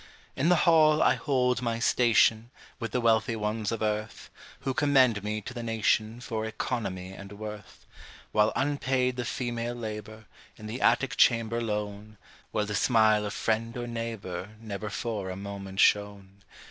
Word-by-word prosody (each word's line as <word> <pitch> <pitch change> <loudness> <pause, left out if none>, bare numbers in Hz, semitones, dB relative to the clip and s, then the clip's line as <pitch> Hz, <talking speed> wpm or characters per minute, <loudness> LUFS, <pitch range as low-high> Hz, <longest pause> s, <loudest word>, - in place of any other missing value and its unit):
In 150 +6 +1
the 180 - +6
hall 155 -2 +5
I - - +5
hold 125 -4 0
my 115 -2 -1
station, 115 -1 +3 0.3
With 115 -2 -4
the 125 - 0
wealthy 115 -1 +2
ones 105 0 -2
of 115 -1 -2
earth, 105 0 -3 0.3
Who 135 - -2
commend 130 -8 +3
me 105 +1 -2
to 125 - -8
the 120 - -5
nation 115 0 0
For 110 -3 -3
economy 105 -5 -4
and 100 +1 -10
worth, 105 -1 -9 0.5
While 105 +1 +3
unpaid 130 -3 0
the 125 -1 -3
female 120 -1 -3
labor, 110 -1 -7 0.3
In 110 - -11
the 110 +4 -5
attic 120 +3 +2
chamber 115 -1 +3
lone, 105 -1 -4 0.3
Where 105 - 0
the 105 - -4
smile 110 -1 +3
of 105 - -5
friend 115 +2 -1
or 120 - -3
neighbor 110 -4 -5
Never 105 -1 -5
for 100 -1 -3
a 95 - -4
moment 100 0 -7
shone. 100 -2 +1
110 Hz, 160 wpm, -28 LUFS, 105-120 Hz, 0.5 s, the